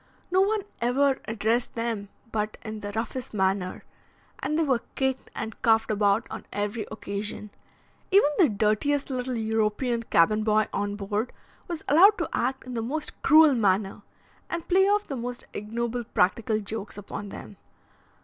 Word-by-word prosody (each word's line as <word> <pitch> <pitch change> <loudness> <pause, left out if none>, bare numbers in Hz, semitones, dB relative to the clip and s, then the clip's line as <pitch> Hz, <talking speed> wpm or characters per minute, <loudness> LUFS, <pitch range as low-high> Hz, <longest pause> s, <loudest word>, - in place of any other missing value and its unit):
No 375 +1 +4
one 415 +1 +1 0.2
ever 265 +3 +2
addressed 225 +2 0
them 230 -4 -2 0.2
but 215 -1 -2
in 220 -1 -6
the 205 0 -5
roughest 230 +1 -4
manner, 190 -1 0 0.6
and 305 - -1
they 325 - +3
were 260 -6 +1
kicked 265 -1 -1
and 220 - -5
cuffed 225 -1 +3
about 205 +2 +2
on 220 - -7
every 205 +1 -2
occasion; 210 0 -5 0.6
even 380 -7 +5
the 335 -7 +6
dirtiest 220 +8 +1
little 255 0 -2
European 220 +2 0
cabin 215 0 +3
boy 215 -1 +3
on 205 +1 -1
board 205 +3 -2 0.4
was 340 -3 -5
allowed 385 +8 +7
to - - -1
act 265 0 -1
in 255 - -7
the 230 - -2
most 300 +7 -4
cruel 310 0 +7
manner, 200 -3 +1 0.5
and 335 -1 -4
play 385 +2 +5
off 415 0 +2
the 275 - -5
most 245 0 -5
ignoble 235 +3 -3
practical 215 +1 +1
jokes 210 0 -5
upon 205 0 -6
them. 200 - -10
225 Hz, 160 wpm, -26 LUFS, 210-265 Hz, 0.6 s, allowed